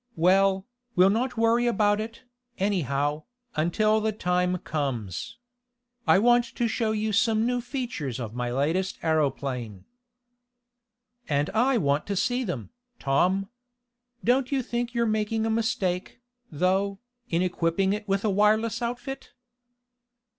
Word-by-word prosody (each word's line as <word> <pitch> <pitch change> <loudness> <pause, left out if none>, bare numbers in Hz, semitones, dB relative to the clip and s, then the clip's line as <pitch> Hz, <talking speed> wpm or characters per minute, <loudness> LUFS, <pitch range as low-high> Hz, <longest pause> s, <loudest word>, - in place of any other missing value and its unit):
Well, 190 +3 +3 0.3
we'll 185 +2 +6
not 245 +3 -1
worry 230 +2 +3
about 210 -2 +2
it, 225 +3 -8 0.3
anyhow, 150 - 0 0.3
until 215 +7 +2
the 220 0 +1
time 180 -2 0
comes. 140 - -4 0.7
I - - +6
want 240 +3 +5
to 240 - +1
show 225 -1 0
you 215 0 -1
some 220 +1 +3
new 245 0 0
features 240 - -4
of 115 -3 -5
my 125 0 -2
latest 160 +9 0
aeroplane." 135 - -1 1.4
"And 145 0 +1
I 245 +4 +3
want 145 -5 +1
to 200 - -1
see 245 +6 0
them, 170 - -5 0.3
Tom. 180 +8 +1 0.7
Don't 255 +2 +2
you 270 -2 +1
think 240 0 -3
you're 235 0 +2
making 220 0 0
a 225 - 0
mistake, 190 -5 -1 0.3
though, 190 +5 +1 0.3
in 170 +2 +1
equipping 180 +2 +1
it 210 0 -5
with 195 +1 0
a - - +3
wireless 215 +3 +2
outfit?" 245 +3 -5
200 Hz, 130 wpm, -26 LUFS, 165-230 Hz, 1.4 s, we'll